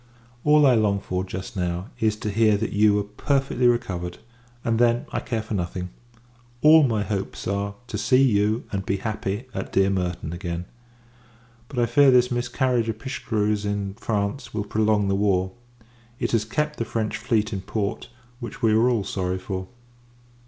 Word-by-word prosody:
All 150 0 +5
I 130 - +6
long 105 -3 +2
for, 90 -1 -3
just 95 +1 -7
now, 90 +1 -2
is 110 -1 +2
to 105 0 -4
hear 110 0 +3
that 110 +2 -3
you 105 0 +4
are 105 - +1
perfectly 135 +3 0
recovered; 90 -7 -1 0.5
and, 115 -1 +1
then, 120 0 +3
I - - -1
care 115 -3 -3
for 110 - -6
nothing: 90 -1 -3 0.7
all 155 +1 +8
my 115 -7 +1
hopes 100 -1 -4
are, 100 +1 -2
to 105 -4 -4
see 125 +5 +4
you, 110 -1 +2
and 95 -1 -2
be 95 +1 -1
happy, 105 +2 -3
at 95 - -5
dear 95 0 +3
Merton, 90 -4 -2
again; 85 -1 -4 1.0
but, 135 - -10
I 120 - +3
fear, 135 +4 +5
this 125 -1 +4
miscarriage 120 -1 0
of 110 - -3
Pichegru's, 105 -4 -1
in 100 -1 -2
France, 110 +3 -3
will 105 -1 -1
prolong 105 -1 +1
the 100 - +1
war. 95 -2 +1 0.7
It - - -2
has 110 -2 +1
kept 150 +6 -2
the 115 - 0
French 110 -1 -2
fleet 110 -1 0
in 95 - -3
port, 105 +3 -3 0.3
which 120 - -8
we 110 - +5
are 115 +3 +4
all 115 -5 +1
sorry 95 -2 -2
for. 95 0 -5
105 Hz, 180 wpm, -24 LUFS, 100-120 Hz, 1.0 s, all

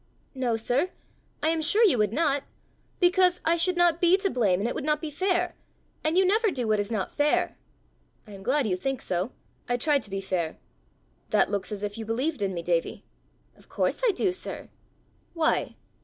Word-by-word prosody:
"No, 255 -4 0
sir; 245 +9 0 0.5
I 315 - +3
am 325 -1 0
sure 410 +9 +4
you 300 - +3
would 210 -1 +2
not 285 +1 +1 0.6
because 360 0 +4
I 330 - +4
should 350 +1 +1
not 345 -1 +3
be 355 +1 +5
to 390 -1 -1
blame, 200 -7 +2
and 210 - 0
it - - -2
would - - -4
not 300 0 +1
be 315 -1 -5
fair; 360 +2 0 0.5
and 315 +3 +1
you 380 - +5
never 435 +4 +3
do 255 - -3
what 215 -1 +2
is 205 +2 -2
not 210 -4 -2
fair!" 295 0 +1 0.7
"I 210 - -14
am 195 -1 -10
glad 270 +6 +1
you 190 -4 +1
think 270 +7 -2
so: 185 +6 -2 0.4
I 245 - +1
try 290 +3 +2
to 210 - -7
be 195 0 -3
fair. 180 -4 -2 0.7
That - - +2
looks 200 +1 -2
as 210 -1 -5
if 205 +2 -4
you 225 - -5
believed 255 +4 -1
in 195 -1 0
me, 170 - -4
Davie!" 170 -1 -1 0.5
"Of - - -22
course - - -1
I 485 - +5
do, 380 0 0
sir!" 365 - -6 0.7
"Why?" 320 -1 +1
275 Hz, 205 wpm, -27 LUFS, 210-350 Hz, 0.7 s, be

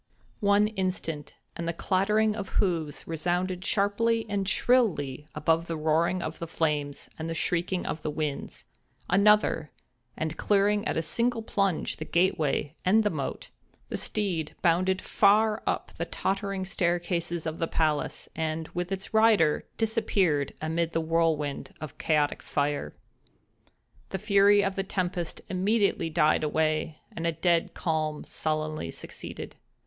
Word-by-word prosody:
One 205 0 +4
instant, 185 -7 -3 0.2
and 170 - -4
the 170 - 0
clattering 210 +5 +2
of 200 -3 -5
hoofs 165 -6 0
resounded 180 +3 -1
sharply 225 +3 +1
and 200 -1 -1
shrilly 165 - +2
above 165 +1 +1
the 165 - -3
roaring 160 +4 +1
of 155 +1 -5
the 170 - -4
flames 150 -3 -1
and 160 +1 -3
the 165 - -3
shrieking 180 +2 -1
of 150 +2 -3
the - - -2
winds—another, 160 +4 0 0.5
and, 160 0 -3
clearing 205 +1 +2
at - - -1
a 165 - +1
single 235 +8 +1
plunge 195 -6 0
the 155 - -5
gate 175 +2 +2
way 145 -1 0
and 215 +4 +4
the 210 - +1
moat, - - -4 0.4
the - - -3
steed 180 -8 -1
bounded 185 +2 +2
far 215 +1 +3
up - - -1
the - - -3
tottering 195 -1 -2
staircases 175 -2 -1
of 160 0 -3
the 165 - 0
palace, 155 -3 0
and, 160 0 -2
with 180 +1 -4
its 195 +2 -4
rider, 220 -8 +4
disappeared 200 - +1
amid 165 +1 -1
the 165 - +1
whirlwind 160 -3 0
of 155 -3 -8
chaotic 150 -2 +1
fire. 145 0 -2 1.1
The 190 - -2
fury 200 0 +5
of 195 -1 0
the 195 - -1
tempest 180 -3 -3
immediately 200 -1 +1
died 155 0 +3
away, 155 0 0 0.2
and 170 0 -2
a - - +2
dead 170 +1 +1
calm 155 -2 -1
sullenly 155 - -2
succeeded. - - -8
170 Hz, 145 wpm, -28 LUFS, 155-200 Hz, 1.1 s, fury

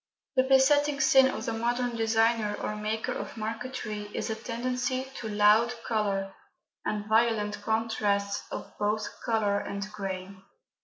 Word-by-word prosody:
The 260 - +6
besetting 280 +2 +4
sin 265 -3 +6
of - - -3
the 230 - -1
modern 240 +1 -1
designer 225 -1 +2
or 210 - -3
maker 215 +1 -2
of - - -5
marquetry 215 -2 -4
is - - -2
a - - -1
tendency 250 +3 -2
to 220 - -5
"loud" 210 +3 +4
colour 200 -3 0 0.5
and 210 -1 -2
violent 220 -1 +2
contrasts 205 -2 0
of - - -6
both 210 +1 0 0.2
colour 210 -3 +1
and 200 0 -4
grain. 195 -2 -6
220 Hz, 140 wpm, -28 LUFS, 210-240 Hz, 0.5 s, The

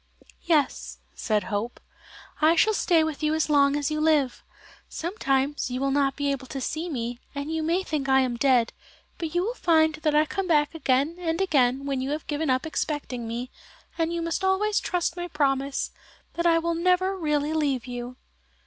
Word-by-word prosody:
"Yes," 300 -5 +1 0.2
said 210 -3 0
Hope, 220 +3 -3 0.6
"I 315 +2 +5
shall 435 +5 +4
stay 340 -5 +3
with 315 -1 -3
you 305 0 +1
as 315 -1 0
long 280 -1 +4
as 290 0 -1
you 305 0 -1
live. 300 -5 +2 0.5
Sometimes 290 -7 -1
you 250 0 -3
will 275 0 0
not 275 -1 +1
be 285 -1 0
able 265 -1 -4
to 270 - -5
see 315 +6 -3
me, 240 -4 -4 0.2
and 285 +3 -3
you 320 - -1
may 340 +4 0
think 295 -6 -3
I 265 0 +5
am 250 -2 -1
dead, 245 -2 +2 0.5
but 330 0 -4
you 350 - +2
will 455 +5 -2
find 320 -8 +3
that 305 -1 +1
I 305 +1 +5
come 385 +4 -3
back 300 -3 +2
again 295 +1 +1
and 330 -2 -1
again 275 -7 +2
when 275 -2 -1
you 265 - -3
have 300 +1 -3
given 300 0 -2
up 255 +2 +1
expecting 290 -6 -3
me, 240 +3 -5 0.4
and 330 0 0
you 340 0 -2
must 335 +3 -2
always 405 +2 +2
trust 350 -2 -1
my 350 0 -4
promise 275 -3 0 0.4
that 340 0 0
I 330 -1 +5
will 335 +1 0
never 365 +3 +2
really 300 -3 0
leave 285 -6 0
you." 245 0 -6
300 Hz, 195 wpm, -26 LUFS, 270-330 Hz, 0.6 s, I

